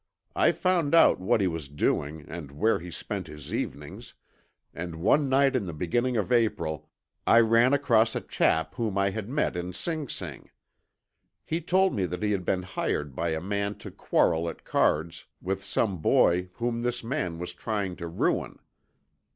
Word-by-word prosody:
I - - +4
found 175 -5 +1
out 165 - +6
what 105 +4 +2
he 95 - +2
was 80 -5 -4
doing 75 +1 -1
and 80 -4 -7
where 110 +11 +1
he 90 +1 -8
spent 95 +2 -5
his 75 -2 -9
evenings, - - -5 0.6
and 85 -1 -6
one 135 - +2
night 135 0 +3
in 120 -6 0
the 85 - -5
beginning 120 +10 0
of 105 +3 -1
April 105 - 0 0.4
I 115 - +7
ran 115 +2 +4
across 115 -6 +3
a - - -1
chap 80 0 +1
whom 110 -5 -2
I 100 0 +2
had 110 +1 -5
met 145 -7 0
in 90 +1 -4
Sing 155 - -3
Sing. - - -7 1.0
He 165 +2 -2
told 190 +3 +2
me 95 -3 0
that 90 +4 -5
he 105 - +1
had 95 -3 -1
been 90 -1 0
hired 75 -6 -3
by 85 +3 -1
a 80 0 -1
man 100 +2 -2
to - - -9
quarrel 85 +1 +1
at - - -10
cards 80 +2 0
with 95 +1 -3
some 100 -1 -1
boy 90 +3 +3
whom 120 0 -2
this 120 0 -2
man 115 - -2
was 90 +1 -6
trying 100 -1 -3
to 85 - -5
ruin. 85 - -1
100 Hz, 180 wpm, -27 LUFS, 85-120 Hz, 1.0 s, I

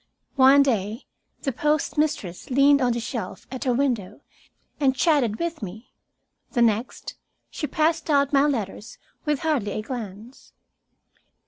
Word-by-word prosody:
One 275 +1 +7
day 220 -2 -1 0.4
the 275 - 0
postmistress 295 - -1
leaned 280 +2 +5
on 245 -2 +2
the 235 - -2
shelf 235 0 -5
at 260 0 -5
her 250 - +2
window 235 -7 -1 0.6
and 270 -3 +2
chatted 260 -7 +2
with 335 -3 -3
me. 210 +4 -9 0.6
The 240 -3 +3
next 225 +2 -1 0.3
she 300 - -3
passed 315 +3 0
out 280 -1 +3
my 280 +1 +5
letters 220 -4 -4 0.3
with 300 -2 0
hardly 280 -11 0
a 215 - -3
glance. 225 0 -8
260 Hz, 135 wpm, -24 LUFS, 220-290 Hz, 0.6 s, One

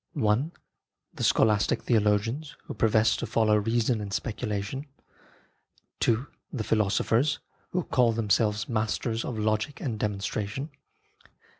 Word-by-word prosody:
I. 105 +5 +3 0.7
The - - -5
scholastic 105 -1 +3
theologians, 115 +6 +1
who - - -7
profess 110 0 +3
to - - -3
follow 110 -2 +3
reason 115 +1 +1
and 100 -1 -5
speculation. 105 +5 -3 1.2
II. 115 +3 +2 0.3
The 120 -6 -3
philosophers, 110 +7 +2 0.3
who 180 -1 -1
call 125 -5 +3
themselves 110 0 +1
masters 115 +1 -1
of 120 - -4
Logic 110 +6 -1
and 115 -6 -3
Demonstration. 105 +6 -3
110 Hz, 115 wpm, -27 LUFS, 105-120 Hz, 1.2 s, I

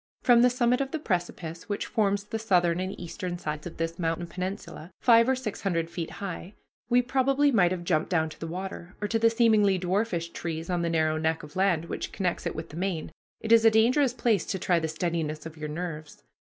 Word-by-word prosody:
From 240 -1 +6
the 250 - +6
summit 245 +1 +2
of 270 - -2
the 320 - -2
precipice 175 - -3
which 205 - -2
forms 200 -2 0
the 220 +2 -4
southern 180 -5 +2
and 185 +1 -4
eastern 180 +1 -5
sides 150 -1 -5
of 170 - -10
this 165 +1 -3
mountain 165 0 -1
peninsula, 185 -1 -6
five 230 0 +5
or 265 - +3
six 250 -5 -5
hundred 170 -4 -1
feet 170 -2 -4
high, 195 0 -6 0.3
we 245 0 +4
probably 275 +3 +2
might 190 -8 +4
have 180 -1 -3
jumped 160 -3 0
down 160 -3 +2
to - - -13
the 165 - -5
water, 185 +1 -6
or 210 - -2
to 225 +2 0
the 230 0 +5
seemingly 220 -4 +4
dwarfish 180 -1 -1
trees 165 +1 -4
on 175 -1 0
the 170 - 0
narrow 155 -1 +1
neck 160 0 -1
of 150 0 -12
land 185 -4 +2
which - - -5
connects 180 -3 -2
it - - -4
with 160 - -6
the 150 - -9
main. 180 -3 -2 0.3
It 225 - -3
is 230 -1 +7
a 225 - +8
dangerous 240 +4 +3
place 230 -6 +1
to 190 - -1
try 175 -1 +2
the 160 - -2
steadiness 160 -1 -2
of 160 -1 -8
your 155 -1 -6
nerves. 155 - -6
180 Hz, 225 wpm, -27 LUFS, 165-225 Hz, 0.3 s, a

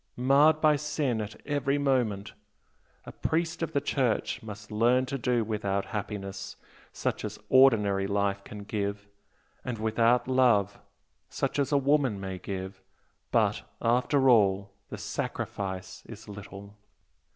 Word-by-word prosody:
marred 140 +5 +5
by 155 -1 +4
sin 145 -5 -1
at 105 0 -7
every 145 -1 0
moment! 120 -8 0 0.7
A - - -8
priest 165 +1 -2
of 165 - -2
the 145 - +1
Church 135 -4 -1
must 105 -1 -9
learn 120 +4 +3
to 135 +2 -4
do 120 -1 +1
without 100 -2 -2
happiness 100 -2 -5 0.4
such - - -3
as - - -5
ordinary 105 -7 +5
life 100 0 0
can 105 0 -9
give 100 -1 -3 0.6
and 125 -2 -4
without 115 +3 +2
love, 120 -6 +3 0.5
such - - -2
as 140 - 0
woman 140 -6 +2
may 95 -1 -5
give 95 0 -6 0.5
but - - +2 0.2
after 125 +4 +2
all 100 -4 +4 0.2
the - - -6
sacrifice 95 -1 -4
is 110 -1 -11
little." 100 0 -10
110 Hz, 130 wpm, -28 LUFS, 100-135 Hz, 0.7 s, marred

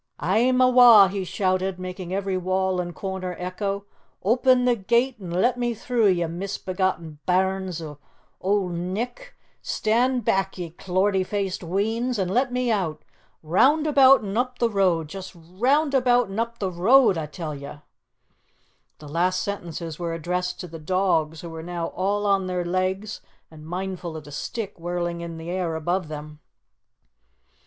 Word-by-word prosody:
"A'm 230 - +2
awa'!" 245 -6 +8
he 195 0 -3
shouted, 185 0 -1
making 185 -1 -6
every 195 0 -1
wall 185 0 0
and 175 -1 -6
corner 190 -2 -4
echo. 195 +2 -3 0.4
"Open 250 +4 +3
the 245 -1 +4
gate 235 +5 +1
an' 180 - -7
let 230 +9 +1
me 240 -1 0
through, 230 0 +1
ye 175 -3 +2
misbegotten 180 -2 -3
bairns 185 -2 0
o' 150 -2 -9 0.4
Auld 195 -1 0
Nick! 210 - -4 0.3
Stand 240 +2 +1
back, 195 0 0
ye 175 -3 -5
clortie 190 +3 0
faced 195 -1 -3
weans, 220 +7 -1
an' 190 -3 -1
let 250 +6 +1
me 250 -1 0
out! 170 -8 -1 0.4
Round 270 - +3
about 275 -4 +6
an' 200 +1 -3
up 250 0 -1
the 235 -2 +1
road! 180 -6 +2
Just 190 +4 -8
round 245 - 0
about 245 -3 +3
an' 200 - -3
up 235 0 -2
the 195 -4 -2
road, 210 +5 +5
a' 160 -2 -3
tell 155 0 -6
ye!" 140 0 -8 1.2
The 150 - -12
last 180 +4 0
sentences 170 -5 -5
were 170 -1 -2
addressed 180 +2 -2
to 180 - -7
the 165 -1 -9
dogs 165 -2 0
who 170 - -7
were 160 0 -7
now 170 0 -4
all 200 +3 -1
on 195 -2 +2
their 180 -1 -2
legs 185 +4 -2 0.3
and 155 -1 -12
mindful 180 -2 -4
of 155 - -9
the 145 - -12
stick 205 - -5
whirling 175 0 -3
in 170 -1 -6
the 165 +2 -6
air 180 -3 -2
above 175 +2 -1
them. 150 0 -8
185 Hz, 165 wpm, -24 LUFS, 175-220 Hz, 1.2 s, awa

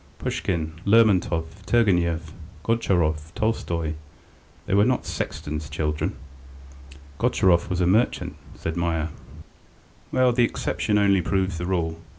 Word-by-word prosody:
Pushkin, 80 -3 -2
Lermontov, 100 -6 +4 0.2
Turgenev, 85 -8 +2 0.3
Gontcharov, 85 -9 0
Tolstoy, 85 -8 -1 0.7
they - - -2
were 100 +1 +5
not 125 +2 +1
sexton's 75 0 -4
children." 75 -1 -2 1.0
"Gontcharov 85 -2 +3
was 90 -1 -1
a - - +3
merchant," 110 +7 +1 0.2
said 80 - -4
Meier. 85 -2 -1 1.0
"Well, 130 -1 +4
the 120 0 +3
exception 105 -2 0
only 100 -2 +4
proves 95 -2 -1
the 85 - -3
rule. 85 -3 -1
90 Hz, 115 wpm, -24 LUFS, 80-105 Hz, 1.0 s, were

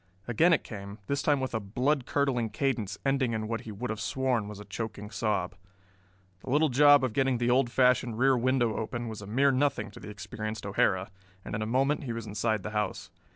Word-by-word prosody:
Again 160 +9 +4
it 165 - +3
came, 100 -1 -8
this 140 +6 -1
time 145 -2 +2
with 130 -1 -3
a 110 - 0
blood 125 +7 0
curdling 130 -5 +1
cadence 110 -7 -1
ending 135 -3 +1
in 110 -1 -2
what 115 0 -3
he 115 - -8
would 110 +4 -4
have 110 -1 -4
sworn 125 -1 0
was 105 -1 -8
a 105 - -9
choking 105 -2 -6
sob. 100 -6 -1 0.9
The - - -8
little 150 +4 +3
job 145 +2 +6
of 125 -4 0
getting 135 -1 +2
the 120 +1 +1
old 125 -1 +3
fashioned 125 -2 +2
rear 135 +2 +4
window 125 -2 +1
open 120 +1 -3
was 110 -2 -7
a 100 - -9
mere 135 +6 +3
nothing 130 -5 0
to - - -12
the - - -9
experienced 110 +2 -6
O'Hara, 100 0 +1 0.3
and - - -6
in 105 - -2
a 110 - -2
moment 135 +5 +1
he 120 - -3
was 115 -1 -5
inside 110 0 -1
the 105 - -5
house. 95 -4 -3
115 Hz, 220 wpm, -29 LUFS, 105-130 Hz, 0.9 s, job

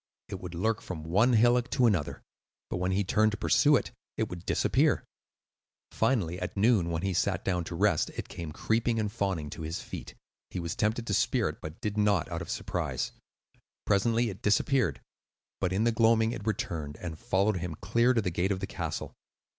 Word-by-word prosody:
It - - -5
would 90 -1 -7
lurk 110 +5 0
from 80 -4 -6
one 105 +10 +3
hillock 120 +2 +4
to 125 - +2
another, 95 -10 0 0.5
but - - -1
when 90 +1 0
he 100 +2 +2
turned 110 +3 +2
to - - -3
pursue 150 +6 +4
it, - - 0 0.3
it 110 - 0
would 90 0 -8
disappear. - - +2 0.9
Finally, 90 -9 +1
at - - -5
noon, 100 -4 +3
when 85 +1 -2
he 95 -1 0
sat - - 0
down 90 -2 0
to 85 - -5
rest, 95 -3 +2
it - - -4
came 85 -3 -6
creeping 115 +7 0
and 105 -2 -1
fawning 95 -9 -2
to 80 - -7
his 80 +2 -3
feet. - - -8 0.3
He 95 - -4
was 85 -1 -3
tempted 110 +2 0
to 105 - -2
spear - - +2
it, - - -9
but 80 +2 -8
did 105 0 -2
not, 105 -4 +2
out 85 -1 -3
of - - -7
surprise. - - -2 0.7
Presently 115 +3 +2
it 95 - -11
disappeared; 125 +4 +2 0.6
but 95 -1 0
in 95 +4 +1
the 120 - +3
gloaming 115 0 +3
it 110 -3 -6
returned, 80 -8 -3
and 80 -3 -6
followed 100 +2 +1
him 85 -2 -4
clear 115 +9 +2
to 115 - +3
the 90 - -1
gate 90 +4 0
of 95 - -1
the 95 - -2
castle. - - -4
100 Hz, 200 wpm, -29 LUFS, 85-115 Hz, 0.9 s, hillock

